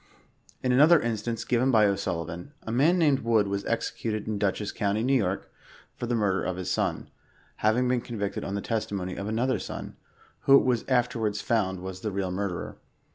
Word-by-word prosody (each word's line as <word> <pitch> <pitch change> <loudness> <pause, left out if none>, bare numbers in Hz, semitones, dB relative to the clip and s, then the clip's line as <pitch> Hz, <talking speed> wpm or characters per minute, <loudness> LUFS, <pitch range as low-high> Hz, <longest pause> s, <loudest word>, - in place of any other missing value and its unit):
In 125 - +2
another 150 +6 +7
instance 115 -1 -2
given 125 +2 +2
by 110 -4 +5
O'SuUi 95 -4 -1
▼an, 85 - -8
a 110 - -5
man 150 +10 +4
named 150 -6 +3
Wood 115 -4 +2
was 100 0 -2
executed 110 -2 -2
in 105 -2 -2
Dutchess 100 0 -1
county, 105 +1 0
N. 130 -1 +3
Y., - - 0 0.6
for 120 - -4
the 120 - 0
murder 100 -4 +1
of 95 - -2
his 95 - -3
son, - - -1 0.5
having 115 +4 +2
been 125 -1 +1
convicted 105 -5 -4
on 95 - -3
the 100 - -2
testimony 100 -5 -3
of 100 - -5
another 120 +4 0
son, - - -7 0.5
who 135 - +8
it - - +2
was 125 -3 +1
afterwards 120 -5 +1
found 95 -5 0
was 95 0 -6
the 105 - -2
real 95 -1 -2
murderer. 95 -1 -3
110 Hz, 190 wpm, -27 LUFS, 100-125 Hz, 0.6 s, who